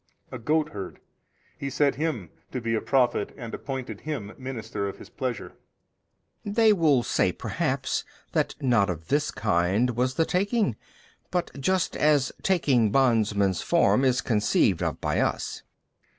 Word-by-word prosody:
A 130 - -6
goatherd, 150 - -2 0.6
He 140 - -3
set 140 +1 +2
him 130 - -3 0.2
to 130 - -3
be 115 -1 -2
a 110 - +1
prophet 125 -6 +1
and 120 -4 -7
appointed 130 -6 -5
him 130 -10 -5
minister 115 -6 -4
of - - -8
His - - -13
Pleasure. 125 -4 -4 0.9
B. - - -5
They 220 +1 +5
will 150 -9 +3
say - - +1
perhaps - - -2 0.3
that - - 0
not 115 -7 +3
of 80 -2 -5
this 145 +2 +2
kind 105 +3 +1
was 125 +2 0
the 165 - +2
taking, 200 - +1 0.5
but 180 -1 -1
just 185 +5 0
as 145 -3 +3
taking 135 - +3
bondman's 105 -7 +2
form 170 -5 +3
is 130 -1 +3
conceived 105 -5 +2
of - - -2
by - - 0
us. - - -1
130 Hz, 150 wpm, -26 LUFS, 110-150 Hz, 0.9 s, They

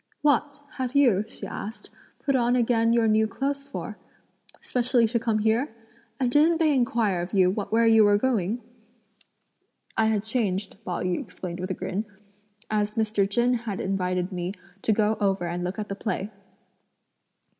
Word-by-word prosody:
"What! 290 0 +2 0.2
have 255 +1 -2
you," 240 -9 +4
she - - -8
asked, 220 +3 -7 0.3
"put 275 - +2
on 245 -1 +2
again 230 -1 +2
your 230 -1 +3
new 220 0 +3
clothes 275 +4 -3
for? - - -6 0.6
specially 245 -1 +1
to 235 +1 0
come 225 -1 0
here? 225 +3 +1 0.4
and 250 -2 +1
didn't 315 +5 +4
they 315 -2 +3
inquire 230 -8 +1
of 175 +4 -6
you 185 -2 +4
where 220 +3 +1
you 225 -1 +6
were 205 0 +5
going?" 230 -1 0 1.3
"I 220 - +3
had 215 -2 +1
changed," 210 -4 -1
Pao 180 -2 -3
yü 180 -1 0
explained 175 -1 -7
with 185 +1 -4
a 185 - -2
grin, 205 +4 -3 0.7
"as 210 0 0
Mr. 210 -3 +1
Chen 240 +4 +2
had 230 -5 -3
invited 185 -1 -1
me 180 0 -3 0.3
to - - +1
go 215 0 +2
over 195 -3 +1
and 175 +1 -3
look 180 +2 -3
at 210 -1 -4
the 195 - -4
play." 205 0 -3
220 Hz, 165 wpm, -26 LUFS, 195-240 Hz, 1.3 s, you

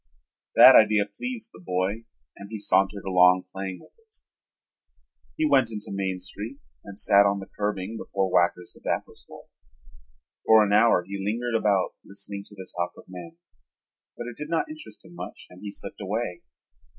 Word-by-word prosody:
That 130 0 +10
idea 105 -1 +5
pleased 230 - -6
the - - -13
boy 100 - -2 0.3
and 100 0 -11
he 110 - -5
sauntered 100 0 +1
along 90 -1 +5
playing 95 -1 -5
with - - -19
it. 445 -1 -24 1.2
He 315 -1 +2
went 130 - +4
into 105 -2 -7
Main 95 -1 -2
Street 100 +8 -7 0.3
and 100 0 -11
sat 100 -1 +5
on 100 0 +1
the 95 - -7
curbing 105 +1 -3
before 95 -3 -2
Wacker's 90 0 +2
tobacco - - -3
store. - - -15 1.0
For 110 -1 +7
an 100 - 0
hour 105 -4 +5
he 100 0 -5
lingered 120 +4 -2
about 100 -4 +2
listening 100 0 -7
to 105 - -15
the 95 -2 -9
talk 85 0 -2
of - - -12
men, 85 -2 -10 0.8
but 120 - -5
it 120 -1 -8
did 150 +1 -6
not 170 - -1
interest 310 -1 -11
him 165 - -15
much - - -8
and 90 +1 -14
he 105 - -6
slipped 100 - -9
away. 100 -1 -3
100 Hz, 175 wpm, -26 LUFS, 95-115 Hz, 1.2 s, That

